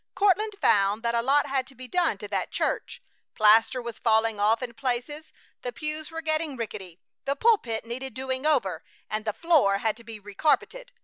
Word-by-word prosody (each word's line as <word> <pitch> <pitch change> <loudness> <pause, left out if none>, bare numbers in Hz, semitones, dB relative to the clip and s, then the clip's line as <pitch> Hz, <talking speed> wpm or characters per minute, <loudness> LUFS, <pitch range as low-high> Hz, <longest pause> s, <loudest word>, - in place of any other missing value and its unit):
Courtland 410 +1 +2
found 200 - +3
that 235 0 0
a 235 - +2
lot 275 +4 +3
had 265 -1 -1
to 265 - -12
be 255 +1 -10
done 340 - +1
to 205 - -8
that 200 - -2
church. - - -2 0.3
Plaster 225 +4 +5
was 235 -2 -7
falling 220 -2 +2
off 220 +4 +2
in 240 -2 -5
places, 270 +4 -4 0.3
the 245 - -4
pews 305 +2 -4
were 325 0 -6
getting 310 -3 -1
rickety. 190 -6 -7 0.3
The 275 +1 0
pulpit 275 - +1
needed 245 +1 -6
doing 260 0 -3
over, 220 - +1 0.3
and 215 0 -3
the 215 - 0
floor 295 -13 +3
had 215 +1 0
to 235 - -12
be 225 -1 -9
recarpeted. 305 - -1
250 Hz, 190 wpm, -26 LUFS, 220-300 Hz, 0.3 s, Plaster